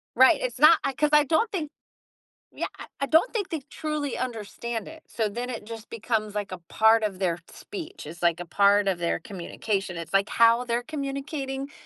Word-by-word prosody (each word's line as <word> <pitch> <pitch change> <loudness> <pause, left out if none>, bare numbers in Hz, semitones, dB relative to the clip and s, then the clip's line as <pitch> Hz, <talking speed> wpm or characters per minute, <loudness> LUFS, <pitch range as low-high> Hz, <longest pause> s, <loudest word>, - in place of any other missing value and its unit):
Right, 260 +6 +6
it's 250 -1 -3
not 310 +4 +8
I 275 - +1
'cause 300 +3 +1
I 300 -1 +6
don't 335 - +2
think 325 -8 -3 0.9
Yeah, - - -2
I - - -8 0.2
I - - +2
don't 320 - +4
think 415 -5 -1
they 320 -4 -3
truly 305 -3 -3
understand 235 -1 -4
it, 315 0 -11
so 220 -2 -1
then 240 +4 -4
it 235 -4 -5
just 225 0 -9
becomes, 215 -2 -2
like, 205 -2 -3
a 185 - -6
part 220 +1 +5
of 200 -3 -1
their 175 -3 0
speech. 380 -1 -8
It's, 165 +3 -9
like, 170 -1 +2
a 175 - -5
part 200 +2 +4
of 185 -3 +1
their 170 -1 0
communication. 195 0 -3
It's, 165 +2 -7
like, 195 +1 +3
how 230 +1 +5
they're 240 0 -1
communicating, 275 -1 -4
235 Hz, 200 wpm, -26 LUFS, 205-290 Hz, 0.9 s, not